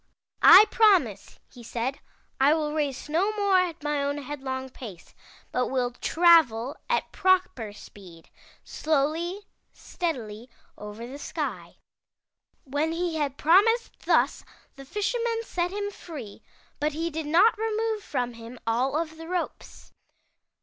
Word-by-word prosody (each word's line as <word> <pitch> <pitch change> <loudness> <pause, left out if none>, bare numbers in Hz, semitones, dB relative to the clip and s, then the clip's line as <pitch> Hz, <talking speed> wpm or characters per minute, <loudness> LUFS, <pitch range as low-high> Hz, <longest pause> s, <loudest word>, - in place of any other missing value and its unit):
*I 380 +5 +10
promise,' 360 - +2 0.2
he 245 - -12
said, 240 +3 -4 0.4
*I 285 +3 +5
will 300 -2 -2
race 290 -4 -2
no 345 +7 +1
more 400 -3 +3
at 345 -4 -2
my 295 -1 0
own 285 +1 -1
headlong 265 -2 -5
pace, 210 -10 -11 0.4
but 250 - 0
will 250 -2 -1
travel 290 -4 +3
at 485 - 0
proper 370 - +1
speed, 185 -5 -14 0.3
slowly, 315 +6 -1 0.3
steadily 245 - -5 0.3
over 210 +2 -8
the 270 +4 -9
sky.' - - -5 0.9
''When 295 +4 -1
he 340 -1 -2
had 285 -3 -2
promised 415 +9 +4
thus, - - +1 0.3
the 275 -1 -11
Fisherman 455 - -1
set 355 -5 -2
him 405 +1 -4
free, 285 - -10 0.4
but 300 0 0
he 330 +2 -3
did 315 -1 -4
not 365 +10 +5
remove 440 0 -2
from 245 -8 -3
him 230 +2 -11
all 250 +5 0
of 320 -1 -4
the 325 0 -9
ropes. 360 0 -5
300 Hz, 135 wpm, -26 LUFS, 255-360 Hz, 0.9 s, I